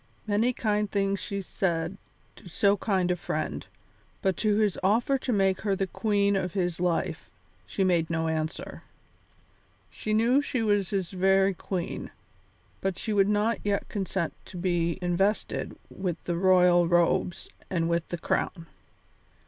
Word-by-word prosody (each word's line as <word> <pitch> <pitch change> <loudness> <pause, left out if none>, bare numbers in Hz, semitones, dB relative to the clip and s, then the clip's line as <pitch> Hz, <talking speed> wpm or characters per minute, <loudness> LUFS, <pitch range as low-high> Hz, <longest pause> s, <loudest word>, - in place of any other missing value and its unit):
Many 215 +3 +2
kind 210 -3 0
things 195 -1 0
she 200 -1 -4
said 170 -1 -1 0.4
to 180 - -13
so 200 +4 +3
kind 190 -3 0
a - - +2
friend, 175 - -3 0.6
but 190 -2 +2
to 210 -1 +2
his 210 -2 +1
offer 230 +8 +2
to 255 - -2
make 195 -3 +2
her 200 -2 +1
the 195 - 0
queen 200 +1 +1
of 185 -3 -1
his 175 -3 -1
life 175 -1 -1 0.4
she 195 - -1
made 175 -3 +2
no 165 -1 0
answer. 160 +1 -3 1.1
She 215 0 -2
knew 240 +5 +4
she 255 -5 -1
was 205 -3 +2
his 190 -4 -2
very 195 +1 +3
queen, 180 -1 -4 0.7
but 190 -1 -1
she 215 +2 -3
would 200 -1 +4
not 210 +2 +1
yet 200 -1 -1
consent 190 -4 -2
to 180 - -10
be 175 -2 0
invested 190 +4 0
with 180 -3 -3
the 175 - -2
royal 180 -1 +5
robes 175 0 +1 0.2
and 165 -3 0
with 170 0 0
the 175 - -3
crown. 170 +1 -2
190 Hz, 155 wpm, -27 LUFS, 175-205 Hz, 1.1 s, royal